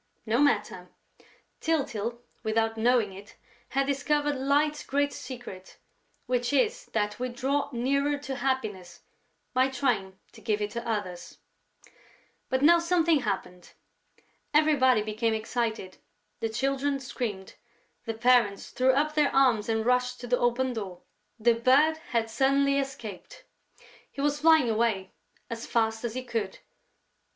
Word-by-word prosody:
No 230 Hz, +2 st, +1 dB
matter! 210 Hz, -10 st, +1 dB, 0.7 s
Tyltyl, 240 Hz, -7 st, -2 dB, 0.2 s
without 225 Hz, +1 st, 0 dB
knowing 225 Hz, -3 st, +2 dB
it, 200 Hz, +2 st, -12 dB, 0.3 s
had 275 Hz, +1 st, +1 dB
discovered 290 Hz, +1 st, 0 dB
Light's 290 Hz, +3 st, +1 dB
great 285 Hz, +1 st, 0 dB
secret, 240 Hz, -8 st, -9 dB, 0.5 s
which 245 Hz, 0 st, 0 dB
is 425 Hz, -, +1 dB
that 210 Hz, 0 st, -1 dB
we 255 Hz, 0 st, -2 dB
draw 270 Hz, +4 st, -1 dB
nearer 280 Hz, +4 st, 0 dB
to 275 Hz, -2 st, -6 dB
happiness 215 Hz, -10 st, -3 dB, 0.5 s
by 260 Hz, +1 st, +3 dB
trying 235 Hz, -8 st, -1 dB
to -, -, -15 dB
give 215 Hz, -2 st, 0 dB
it 210 Hz, 0 st, -3 dB
to 235 Hz, +1 st, -5 dB
others. 185 Hz, -5 st, -4 dB, 1.1 s
But 260 Hz, +1 st, 0 dB
now 340 Hz, +3 st, +7 dB
something 335 Hz, -2 st, +2 dB
happened. 180 Hz, -6 st, -4 dB, 0.8 s
Everybody 265 Hz, -7 st, +4 dB
became 220 Hz, +1 st, -1 dB
excited, 220 Hz, -3 st, -3 dB, 0.4 s
the 225 Hz, 0 st, -1 dB
Children 275 Hz, +4 st, -1 dB
screamed, 225 Hz, -7 st, -5 dB, 0.5 s
the 225 Hz, -, -3 dB
parents 235 Hz, -4 st, +2 dB
threw 260 Hz, +1 st, +3 dB
up 300 Hz, +3 st, +1 dB
their 300 Hz, -2 st, +3 dB
arms 245 Hz, -6 st, +3 dB
and 220 Hz, 0 st, 0 dB
rushed 250 Hz, 0 st, +1 dB
to -, -, -6 dB
the 245 Hz, +1 st, +1 dB
open 245 Hz, +2 st, +1 dB
door: 190 Hz, -6 st, -6 dB, 0.4 s
the 235 Hz, +2 st, +4 dB
Bird 270 Hz, +7 st, +4 dB
had 230 Hz, -2 st, 0 dB
suddenly 275 Hz, +4 st, +2 dB
escaped! 240 Hz, -8 st, -7 dB, 0.7 s
He -, -, -11 dB
was 290 Hz, +1 st, +1 dB
flying 320 Hz, -4 st, +5 dB
away 220 Hz, -4 st, 0 dB, 0.4 s
as 230 Hz, 0 st, -6 dB
fast 225 Hz, -1 st, 0 dB
as 235 Hz, -1 st, -3 dB
he 255 Hz, -, -3 dB
could. 225 Hz, -6 st, -3 dB
245 Hz, 135 wpm, -28 LUFS, 220-275 Hz, 1.1 s, now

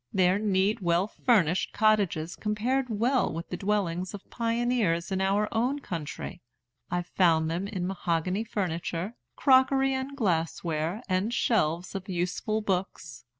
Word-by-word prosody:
Their 185 Hz, +1 st, +3 dB
neat, 205 Hz, +1 st, +1 dB
well 170 Hz, +1 st, +2 dB
furnished 195 Hz, -6 st, +1 dB
cottages 200 Hz, -7 st, +2 dB
compared 245 Hz, +5 st, -1 dB
well 235 Hz, +4 st, +1 dB
with 165 Hz, +2 st, -6 dB
the -, -, -3 dB
dwellings 190 Hz, -2 st, -1 dB
of 200 Hz, -, -12 dB
pioneers 230 Hz, -7 st, 0 dB
in 190 Hz, 0 st, 0 dB
our 200 Hz, +2 st, +2 dB
own 245 Hz, +5 st, +1 dB
country. 170 Hz, -, -6 dB, 0.5 s
I 175 Hz, 0 st, -1 dB
found 165 Hz, -3 st, +2 dB
in 175 Hz, +4 st, -2 dB
them 195 Hz, -4 st, -3 dB
mahogany 180 Hz, +1 st, -1 dB
furniture, 180 Hz, -1 st, -3 dB, 0.2 s
crockery 270 Hz, 0 st, +4 dB
and 265 Hz, +1 st, -4 dB
glass 170 Hz, -, 0 dB
ware, 165 Hz, +6 st, -2 dB
and 190 Hz, +4 st, 0 dB
shelves 180 Hz, -8 st, +1 dB
of 195 Hz, -1 st, -6 dB
useful 185 Hz, +5 st, -1 dB
books. 185 Hz, -, -3 dB
195 Hz, 140 wpm, -28 LUFS, 175-220 Hz, 0.5 s, crockery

